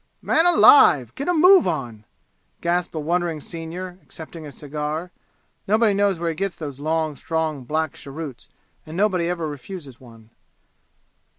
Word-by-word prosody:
"Man 330 Hz, +2 st, +3 dB
alive 150 Hz, -, +6 dB
get 280 Hz, -, -5 dB
a -, -, +3 dB
move 360 Hz, -, +6 dB
on!" 120 Hz, -10 st, -4 dB, 0.5 s
gasped 175 Hz, 0 st, -1 dB
a -, -, -2 dB
wondering 170 Hz, +1 st, -1 dB
senior, 175 Hz, +4 st, -7 dB
accepting 160 Hz, -1 st, -10 dB
a -, -, -9 dB
cigar. 150 Hz, +4 st, -5 dB, 0.6 s
Nobody 215 Hz, +1 st, +3 dB
knows 200 Hz, -2 st, +1 dB
where 170 Hz, 0 st, -2 dB
he 165 Hz, -, -3 dB
gets 195 Hz, +2 st, -3 dB
those 145 Hz, -4 st, -7 dB
long, 155 Hz, 0 st, -1 dB
strong, 155 Hz, -4 st, -3 dB
black 155 Hz, +1 st, -1 dB
cheroots, 140 Hz, -2 st, -9 dB, 0.3 s
and 160 Hz, +2 st, -9 dB
nobody 185 Hz, -4 st, +1 dB
ever 170 Hz, -3 st, -2 dB
refuses 145 Hz, -2 st, -9 dB
one. 115 Hz, -3 st, -16 dB
160 Hz, 150 wpm, -22 LUFS, 150-180 Hz, 0.6 s, alive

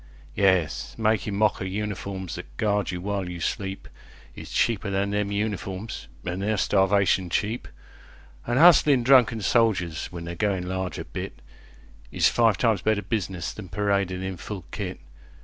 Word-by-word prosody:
Yes, 95 Hz, -6 st, +1 dB
makin' 110 Hz, -2 st, +1 dB
mock 105 Hz, 0 st, +2 dB
o' -, -, -1 dB
uniforms 95 Hz, -2 st, -4 dB
that -, -, -9 dB
guard 105 Hz, -2 st, +1 dB
you 90 Hz, -, -3 dB
while 100 Hz, -1 st, -3 dB
you 90 Hz, -1 st, -6 dB
sleepIs 95 Hz, +3 st, -6 dB
cheaper 110 Hz, -3 st, +1 dB
than 100 Hz, +1 st, 0 dB
them 105 Hz, 0 st, -1 dB
uniforms, 100 Hz, 0 st, -3 dB, 0.2 s
an' 90 Hz, +1 st, -3 dB
they're 105 Hz, +2 st, 0 dB
starvation 95 Hz, -1 st, +2 dB
cheap; 110 Hz, +7 st, -1 dB, 0.8 s
An' 120 Hz, +1 st, +1 dB
hustlin' 150 Hz, -5 st, +6 dB
drunken 120 Hz, -3 st, +5 dB
soldiers 95 Hz, -8 st, +1 dB
when 85 Hz, -2 st, -8 dB
they're 85 Hz, -, -5 dB
goin' 95 Hz, -1 st, -1 dB
large 95 Hz, 0 st, -3 dB
a -, -, -5 dB
bitIs 60 Hz, 0 st, -5 dB
five 115 Hz, -4 st, +3 dB
times 110 Hz, -6 st, +2 dB
better 105 Hz, 0 st, +1 dB
business 95 Hz, -7 st, -3 dB
than 100 Hz, -4 st, -9 dB
paradin' 100 Hz, -1 st, 0 dB
in 95 Hz, -1 st, -4 dB
full 95 Hz, +2 st, -7 dB
kit. 95 Hz, -3 st, -5 dB
100 Hz, 150 wpm, -25 LUFS, 90-105 Hz, 0.8 s, hustlin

